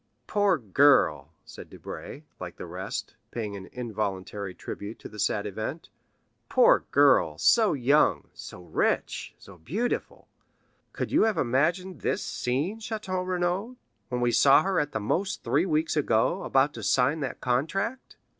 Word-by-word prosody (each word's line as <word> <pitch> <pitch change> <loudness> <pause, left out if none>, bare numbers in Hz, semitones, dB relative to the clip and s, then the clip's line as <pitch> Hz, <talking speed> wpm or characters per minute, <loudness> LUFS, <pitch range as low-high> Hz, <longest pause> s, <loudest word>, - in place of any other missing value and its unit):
"Poor 205 -4 +2
girl," 105 - +3
said - - -11
Debray, 150 - -9 0.2
like 90 -1 -7
the - - -8
rest, 95 +6 -5 0.2
paying 110 -4 -5
an 95 -1 -9
involuntary 100 -4 -4
tribute 105 +3 -7
to - - -10
the 105 - -12
sad 105 0 0
event,—"poor 155 - -1
girl, - - +4
so 220 -3 +4
young, 140 +2 +2
so 90 - -10
rich, - - -1
so 95 -3 -15
beautiful! 200 - -3 0.6
Could - - -4
you - - +4
have 220 -2 0
imagined 155 - 0
this - - -1
scene, 145 - -2
Château 210 -4 -3
Renaud, 185 +6 -1 0.3
when 125 -1 -2
we 120 0 +2
saw 140 +5 +6
her, 190 -1 +1
at 145 0 -1
the 110 - -2
most 190 - -2
three 145 +10 +1
weeks 155 -1 0
ago, 150 - +1
about 135 +2 +2
to - - -8
sign 135 +5 +2
that 135 - -4
contract?" 180 - -2
140 Hz, 145 wpm, -27 LUFS, -, 0.6 s, saw